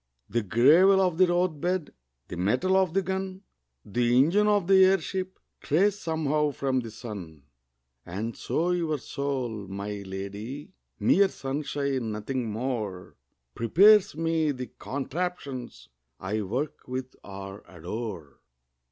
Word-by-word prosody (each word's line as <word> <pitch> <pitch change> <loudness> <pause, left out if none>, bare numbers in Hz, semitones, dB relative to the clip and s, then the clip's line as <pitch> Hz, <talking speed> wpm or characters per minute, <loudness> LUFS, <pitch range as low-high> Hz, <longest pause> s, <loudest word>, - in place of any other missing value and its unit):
The 120 - 0
gravel 150 - +5
of 180 -3 +1
the 185 - +6
roadbed, 175 -1 0 0.4
The - - -6
metal 125 - +1
of 190 -3 +2
the 195 - +3
gun, 190 +1 -4 0.4
The 120 +3 +1
engine 180 +11 +4
of 205 -3 +3
the 190 +1 +6
airship 190 0 +1 0.2
Trace 195 +7 +2
somehow 155 -3 0
from 135 -1 0
the 115 -2 -5
sun. 100 - -9 0.6
And 105 - -4
so 175 +3 -1
your 165 -4 0
soul, 130 -7 -3
my 100 +1 -5
lady 100 - -6 0.3
(Mere 200 0 +4
sunshine, 135 -4 -2
nothing 115 +3 -3
more) 110 -5 -4 0.4
Prepares 190 - +5
me 165 -1 +1
the 130 -3 -4
contraptions 135 - -4 0.3
I 105 +3 -2
work 125 +9 -4
with 130 0 -5
or 95 0 -8
adore. 90 - -7
135 Hz, 125 wpm, -27 LUFS, 105-175 Hz, 0.6 s, the